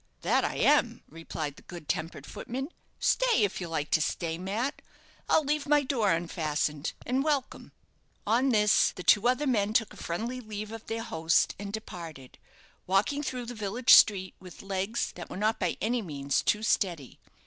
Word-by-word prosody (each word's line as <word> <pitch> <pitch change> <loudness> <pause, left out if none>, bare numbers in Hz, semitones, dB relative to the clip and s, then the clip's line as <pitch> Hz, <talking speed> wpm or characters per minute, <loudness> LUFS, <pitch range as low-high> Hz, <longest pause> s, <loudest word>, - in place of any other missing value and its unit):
"That - - +2
I - - -1
am," - - +2
replied 155 -2 -6
the - - -13
good 170 -4 -11
tempered 160 +3 -3
footman. 265 +4 -5 0.3
"Stay, - - +3
if 200 -2 -1
you 175 - -4
like 155 -3 -3
to 160 - +3
stay, 165 +1 -2
Mat. 215 +10 -3 0.5
I'll 315 - +4
leave 295 0 -1
my 295 0 +4
door 235 -7 +1
unfastened, 155 -3 -1
and 260 +2 0
welcome." 285 -4 -2 0.5
On 240 +6 +2
this, 210 -4 +4
the 180 - -8
two 210 +5 +5
other 255 +4 +2
men 215 -6 +1
took 225 -1 +1
a - - -14
friendly 230 +9 -4
leave 215 -1 -6
of 225 0 -9
their 225 0 -3
host 165 -8 +1
and 200 0 -5
departed, 165 -10 -8 0.5
walking 200 +10 +1
through 255 -4 -4
the 245 - -6
village 220 +2 +3
street 190 -3 +6
with 185 0 -12
legs 195 +4 -2
that 175 - -9
were - - -7
not 215 +3 0
by 180 -3 -1
any 235 +4 0
means 140 -7 -1
too 210 +1 +1
steady. 175 - -1
205 Hz, 180 wpm, -29 LUFS, 170-240 Hz, 0.5 s, street